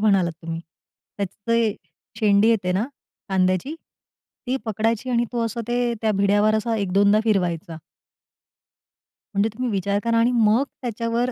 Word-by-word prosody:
म्हणालात 195 Hz, -5 st, +3 dB
तुम्ही, 165 Hz, 0 st, -4 dB, 0.6 s
त्याची 200 Hz, -2 st, -3 dB
ते 230 Hz, -3 st, +2 dB, 0.4 s
शेंडी 210 Hz, 0 st, +4 dB
येते 195 Hz, -5 st, +2 dB
ना 195 Hz, +5 st, +1 dB, 0.4 s
कांद्याची 185 Hz, -, +1 dB, 0.7 s
ती 260 Hz, +2 st, 0 dB
पकडायची 225 Hz, +3 st, -1 dB
आणि 240 Hz, -1 st, +2 dB
तो 235 Hz, -1 st, 0 dB
असं 230 Hz, +1 st, -3 dB
ते 240 Hz, 0 st, +1 dB
त्या 220 Hz, -, +2 dB
भिड्यावर 205 Hz, +2 st, +3 dB
असा 220 Hz, +1 st, 0 dB
1-2दा 200 Hz, +1 st, +3 dB
फिरवायचा. 175 Hz, -5 st, 0 dB, 1.6 s
म्हणजे 205 Hz, +3 st, +2 dB
तुम्ही 250 Hz, +2 st, -2 dB
विचार 200 Hz, +1 st, 0 dB
करा 230 Hz, 0 st, +1 dB
आणि 235 Hz, +2 st, +3 dB
मग 225 Hz, +2 st, +4 dB, 0.2 s
त्याच्यावर 235 Hz, +1 st, -1 dB
215 Hz, 140 wpm, -23 LUFS, 195-230 Hz, 1.6 s, शेंडी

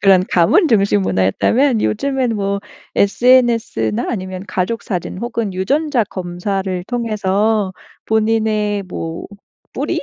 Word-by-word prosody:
그런 190 Hz, -2 st, +5 dB
가문 185 Hz, -, +4 dB
중심 200 Hz, -3 st, +3 dB
문화였다면 225 Hz, -, +2 dB
요즘엔 260 Hz, 0 st, 0 dB
뭐 200 Hz, -1 st, -1 dB, 0.4 s
SNS나 230 Hz, -, +2 dB
아니면 185 Hz, -4 st, -4 dB
가족사진 185 Hz, -2 st, -3 dB
혹은 230 Hz, -3 st, -3 dB
유전자 265 Hz, +7 st, +1 dB
검사를 185 Hz, 0 st, -3 dB
통해서 215 Hz, -3 st, 0 dB, 0.3 s
본인의 215 Hz, -2 st, +1 dB
뭐 165 Hz, -2 st, -6 dB, 0.5 s
뿌리? -, -, -1 dB
205 Hz, 255 characters per minute, -18 LUFS, 185-230 Hz, 0.5 s, 그런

